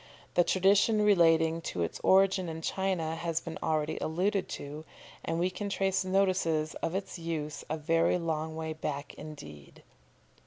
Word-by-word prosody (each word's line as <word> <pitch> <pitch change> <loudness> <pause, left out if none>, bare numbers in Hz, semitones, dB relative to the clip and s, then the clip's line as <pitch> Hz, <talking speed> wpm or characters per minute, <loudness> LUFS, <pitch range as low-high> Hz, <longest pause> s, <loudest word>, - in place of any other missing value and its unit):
The 175 - +5
tradition 200 +4 +3
relating 165 -4 +4
to 90 - -3
its 85 - -4
origin 190 -2 +4
in 160 0 -6
China 180 -4 -1
has 165 -1 -1
been 165 -1 -7
already 155 -1 0
alluded 185 +5 0
to, 145 +2 -6 0.4
and 165 - -2
we 180 +2 +1
can 200 +2 -4
trace 195 -1 +1
notices 185 -5 +1
of 165 - -2
its 190 -2 -4
use 155 -3 -4
a 155 - -1
very 165 +3 +2
long 160 -2 -2
way 160 0 -3
back 145 -2 -5
indeed. 75 - -11
165 Hz, 155 wpm, -30 LUFS, 155-190 Hz, 0.4 s, The